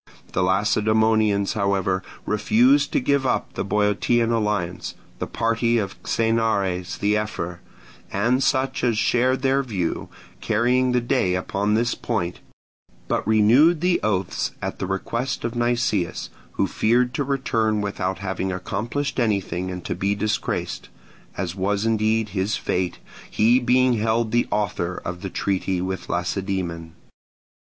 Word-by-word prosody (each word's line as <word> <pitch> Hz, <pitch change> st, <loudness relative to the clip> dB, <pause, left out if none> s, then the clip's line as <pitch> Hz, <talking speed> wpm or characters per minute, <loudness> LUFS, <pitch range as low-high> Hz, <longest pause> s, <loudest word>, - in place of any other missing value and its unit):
The -, -, +1 dB
Lacedaemonians, 105 Hz, +1 st, +2 dB
however, 100 Hz, -3 st, 0 dB, 0.2 s
refused 240 Hz, -, +3 dB
to 290 Hz, -, +3 dB
give 140 Hz, -, +1 dB
up -, -, -1 dB
the -, -, -2 dB
Boeotian 105 Hz, +3 st, +1 dB
alliance—the 105 Hz, -6 st, -3 dB
party 115 Hz, +1 st, +1 dB
of 100 Hz, -3 st, -2 dB
Xenares 105 Hz, -5 st, 0 dB
the 105 Hz, +1 st, +1 dB
ephor, 105 Hz, -5 st, -2 dB, 0.5 s
and 120 Hz, +7 st, +1 dB
such 130 Hz, -1 st, +1 dB
as 120 Hz, -3 st, +2 dB
shared 130 Hz, +4 st, +2 dB
their 135 Hz, +1 st, +3 dB
view, 100 Hz, -10 st, -3 dB, 0.3 s
carrying 125 Hz, +4 st, +2 dB
the 125 Hz, -, +2 dB
day 120 Hz, -7 st, +1 dB
upon 100 Hz, +3 st, 0 dB
this 120 Hz, +2 st, +1 dB
point—but 90 Hz, -2 st, -5 dB
renewed 120 Hz, +10 st, +5 dB
the 180 Hz, 0 st, +2 dB
oaths 95 Hz, -4 st, -1 dB
at -, -, -5 dB
the -, -, -2 dB
request 115 Hz, +7 st, -2 dB
of 115 Hz, -, -2 dB
Nicias, 120 Hz, -6 st, 0 dB, 0.2 s
who -, -, +1 dB
feared 120 Hz, +3 st, +1 dB
to 145 Hz, -, 0 dB
return 115 Hz, -6 st, 0 dB
without 95 Hz, -2 st, -2 dB
having 95 Hz, 0 st, -3 dB
accomplished 115 Hz, +10 st, -3 dB
anything 100 Hz, -5 st, 0 dB
and 90 Hz, -1 st, -6 dB
to -, -, -1 dB
be 100 Hz, +1 st, 0 dB
disgraced; 105 Hz, +1 st, -2 dB, 0.5 s
as 90 Hz, -3 st, -2 dB
was 100 Hz, +2 st, -1 dB
indeed 110 Hz, 0 st, +1 dB
his 95 Hz, +2 st, -1 dB
fate, 90 Hz, -1 st, -1 dB, 0.3 s
he 115 Hz, +4 st, +4 dB
being 125 Hz, +1 st, +3 dB
held 110 Hz, +1 st, +1 dB
the 120 Hz, 0 st, +2 dB
author 90 Hz, -4 st, -1 dB
of 90 Hz, 0 st, -5 dB
the 95 Hz, -, -4 dB
treaty 95 Hz, -1 st, -1 dB
with 95 Hz, +1 st, -4 dB
Lacedaemon. 85 Hz, -2 st, -3 dB
105 Hz, 135 wpm, -23 LUFS, 95-120 Hz, 0.5 s, renewed